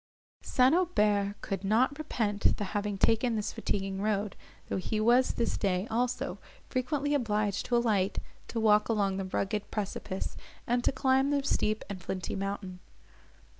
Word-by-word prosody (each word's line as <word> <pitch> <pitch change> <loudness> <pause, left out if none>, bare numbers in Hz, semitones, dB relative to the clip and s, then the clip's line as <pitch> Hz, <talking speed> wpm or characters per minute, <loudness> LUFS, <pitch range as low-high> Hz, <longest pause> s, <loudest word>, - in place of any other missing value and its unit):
St. 255 +2 +3
Aubert 210 - +2
could 195 -1 -3
not 245 +8 +2
repent 210 -9 +1
the - - -2
having 205 0 -2
taken 225 +3 +3
this 210 -1 -2
fatiguing 195 -1 -2
road, 210 -1 0 0.3
though - - -2
he 215 +3 -2
was 240 +4 +4
this 235 - 0
day, 185 -1 +1
also, 245 +2 -1 0.3
frequently 285 +3 0
obliged 210 -6 0
to 245 - +1
alight, 210 -5 +1 0.3
to 230 - -3
walk 210 -1 +4
along 200 -4 +1
the 195 - -2
rugged 195 +2 -2
precipice, 195 -2 -4 0.3
and 245 +1 +1
to - - +3
climb 265 +1 +2
the 285 -1 +1
steep 215 -5 0
and 195 -3 -6
flinty 185 0 -4
mountain. 195 -2 -4
210 Hz, 155 wpm, -30 LUFS, 195-245 Hz, 0.3 s, was